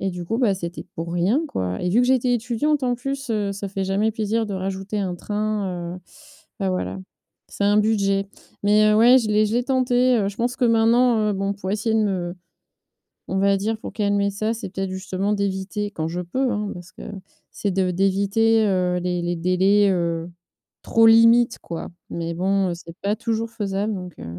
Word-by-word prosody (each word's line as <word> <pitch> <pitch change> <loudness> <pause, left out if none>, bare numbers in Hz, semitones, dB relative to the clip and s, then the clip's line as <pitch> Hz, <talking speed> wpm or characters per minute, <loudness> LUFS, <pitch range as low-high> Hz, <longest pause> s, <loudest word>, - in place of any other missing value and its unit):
et 195 - 0
du 175 -1 -6
coup 225 +6 -2
bah 225 -6 +3
c'était 175 -1 -6
pour 165 +1 -5
rien, 195 - +1
quoi. 90 0 -3
Et 180 - 0
vu 225 - +4
que 245 - +2
j'étais 255 -1 +2
étudiante 250 +5 0
en 250 -1 +1
plus, 275 +2 -5
heu, 205 -2 0
ça 200 0 -5
fait 195 0 -3
jamais 200 +3 +1
plaisir 220 +1 -1
de 200 - -4
rajouter 195 +2 -4
un 185 -3 -2
train, 200 -4 -3
heu - - -12 0.6
bah 195 - 0
voilà. 185 +1 -3 0.5
C'est 200 - -3
un 205 +1 +4
budget. 200 -2 +1 0.4
Mais, 210 +1 +4
heu, - - +3
ouais, 245 +4 +7
je 220 -3 -2
l'ai 210 0 +3
je 210 - -3
l'ai 245 - +2
tenté, 255 -1 +2
heu. 200 -1 0
Je 200 - -8
pense 240 +1 -1
que 255 - +1
maintenant, 230 +1 +4
heu, - - 0
bon 195 +1 -1
pour 190 -1 -5
essayer 220 +2 0
de 220 - +3
me 180 -3 -2 1.0
on 190 - -1
va 200 0 +3
dire, 220 +3 -2
pour - - -8
calmer 200 -1 +1
ça, 215 +3 -1
c'est 230 -2 -6
peut-être 195 0 -4
justement 190 +1 -2
d'éviter, 200 +1 -2
quand 160 -4 -3
je 175 - -4
peux, 255 +9 -1
hein, 210 0 -2
parce 175 -1 -11
que - - -12 0.5
c'est 200 - -2
de 185 -1 +1
d'éviter, 200 +4 +2
heu, 180 -2 +1
les 180 0 -1
les 175 0 -1
délais, 190 +4 +3
heu, 170 -1 -1 0.5
trop 225 0 +4
limites, 230 +1 +5
quoi. 165 -1 -6 0.2
Mais 170 0 -4
bon, 190 +1 +1
heu, - - -2
c'est 170 -1 -12
pas 205 +2 0
toujours 230 0 -2
faisable 205 -1 -2
donc, 180 -3 -7
heu - - -8
200 Hz, 210 wpm, -22 LUFS, 185-225 Hz, 1.0 s, ouais